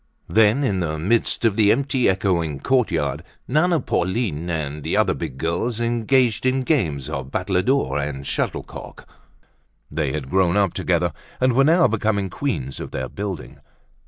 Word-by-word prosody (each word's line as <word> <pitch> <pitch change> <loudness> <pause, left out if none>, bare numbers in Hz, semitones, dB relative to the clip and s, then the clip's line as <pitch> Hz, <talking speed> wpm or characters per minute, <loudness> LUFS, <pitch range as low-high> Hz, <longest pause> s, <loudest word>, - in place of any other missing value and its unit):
Then, 110 +5 +4
in 100 -8 0
the 80 -3 -2
midst 110 +8 +1
of 110 -3 +3
the 105 -1 +4
empty, 135 -4 +2
echoing 85 -6 0
courtyard, 85 - 0 0.2
Nana, 160 +5 +2
Pauline 95 - -1
and 75 -3 -3
other - - +3
big 65 - -6
girls 85 - -1
engaged 120 0 +1
in 130 +1 +1
games 80 - 0
of 65 -1 -5
battledore 95 - 0
and 70 -1 -4
shuttlecock. - - -5 0.8
They 75 -2 -1
had 65 -2 -5
grown 95 0 +3
up 100 -4 +2
together 85 -2 0 0.3
and 130 0 +3
were 135 +3 +4
now 165 +4 +5
becoming 100 -3 -1
queens 70 - -3
of - - -6
their - - -4
building. 100 -4 -6
100 Hz, 150 wpm, -22 LUFS, 80-125 Hz, 0.8 s, now